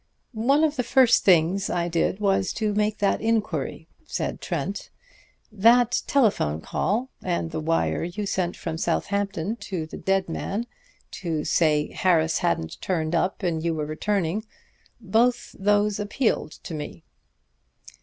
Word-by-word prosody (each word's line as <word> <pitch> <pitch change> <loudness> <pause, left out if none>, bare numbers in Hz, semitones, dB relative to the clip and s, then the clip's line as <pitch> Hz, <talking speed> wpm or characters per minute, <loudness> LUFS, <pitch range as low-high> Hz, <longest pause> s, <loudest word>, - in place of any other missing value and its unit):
"One 270 +7 +2
of 305 -2 +1
the 250 - +1
first 255 0 +4
things 185 +1 +3
I 175 -1 0
did 175 +3 0
was 195 -2 +1
to 215 -1 -1
make 210 +1 0
that 200 -1 +1
inquiry," 225 -1 -1 0.2
said - - -3
Trent. 175 +4 -3 0.6
"That 230 +3 +4
telephone 205 - +2
call, 230 - -1
and 170 -2 -2
the 160 - -3
wire 165 +1 0
you 175 +5 -4
sent 180 -3 -1
from 165 -1 -4
Southampton 200 +3 -1
to 180 -8 -4
the 155 - -9
dead 195 0 0
man, 200 +6 -3 0.6
to 160 -5 -2
say 150 -3 +2
Harris 165 -3 +2
hadn't 80 -1 -1
turned 160 -3 -1
up 180 +3 0
and 165 -3 -1
you 165 -1 0
were 155 -1 -2
returning 190 +4 -1 0.6
both 230 +3 +1
those 205 +1 +2
appealed 205 - -1
to - - -7
me." 150 - -6
190 Hz, 145 wpm, -25 LUFS, 165-215 Hz, 0.6 s, first